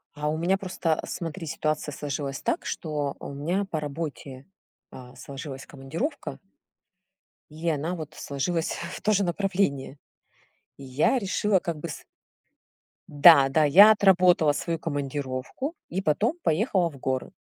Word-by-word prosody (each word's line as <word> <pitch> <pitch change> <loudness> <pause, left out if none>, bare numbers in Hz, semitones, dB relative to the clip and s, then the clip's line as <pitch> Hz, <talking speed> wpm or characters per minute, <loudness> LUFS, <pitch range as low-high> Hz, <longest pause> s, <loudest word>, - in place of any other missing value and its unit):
А 150 0 -3
у 155 - -1
меня 180 +4 +1
просто, 180 -4 -1
э, - - -8
смотри, 165 0 -5
ситуация 155 0 -2
сложилась 140 -1 -4
так, - - -1
что 150 -3 -3
у - - -7
меня 170 +8 -1
по 160 - -2
работе, 145 -3 -6 0.5
а, 125 0 -12
сложилась 135 -1 -8
командировка. 165 - -5 1.1
И 160 +3 -7
она, 160 +4 -1
вот, 155 -2 -7
сложилась 160 +4 -2 0.2
в - - -8
то 215 - +1
же 200 -1 +3
направление. 175 -7 -1 0.8
И 140 - -11
я 135 - +2
решила, 205 -1 +1
как 170 -2 -4
бы, 165 +3 -6
с 150 - -8 1.1
Да 145 -2 +8
да, 155 +3 +3
я 190 +9 +9
отработала 180 -6 +4
свою 165 +3 -2
командировку 145 - -4 0.2
и 185 - -2
потом 205 - +1
поехала 180 -1 +1
в 140 - -13
горы. 130 0 -2
155 Hz, 145 wpm, -26 LUFS, 140-180 Hz, 1.1 s, я